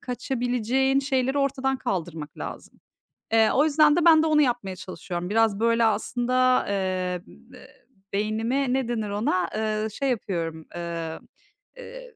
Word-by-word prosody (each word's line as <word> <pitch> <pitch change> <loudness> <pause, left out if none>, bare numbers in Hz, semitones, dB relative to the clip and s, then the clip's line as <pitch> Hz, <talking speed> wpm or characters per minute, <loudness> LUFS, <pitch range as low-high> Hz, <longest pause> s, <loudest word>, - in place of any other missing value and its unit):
kaçabileceğin 250 +1 0
şeyleri 265 0 0
ortadan 270 -1 0
kaldırmak 170 - -4
lazım. - - -8 0.5
Eee, 225 -1 +4
o 280 - +4
yüzden 300 -1 +4
de 345 -1 +1
ben 320 -2 +7
de - - +1
onu 305 -1 +4
yapmaya 240 -8 0
çalışıyorum. 180 -1 -6
Biraz, 220 -1 +2
böyle, 230 +1 +2
aslında, 250 +3 +1
eee, 185 -2 -1
ı - - -17 0.2
m - - -13 0.6
beynimi, 225 +6 0
ne 265 -2 0
denir 220 -3 -2
ona, 200 -2 0
eee, 215 0 -1
şey 270 +6 -2
yapıyorum, 165 -9 -3
eee, 170 -2 -5 0.6
eee, - - -11
230 Hz, 145 wpm, -25 LUFS, 195-265 Hz, 0.6 s, ben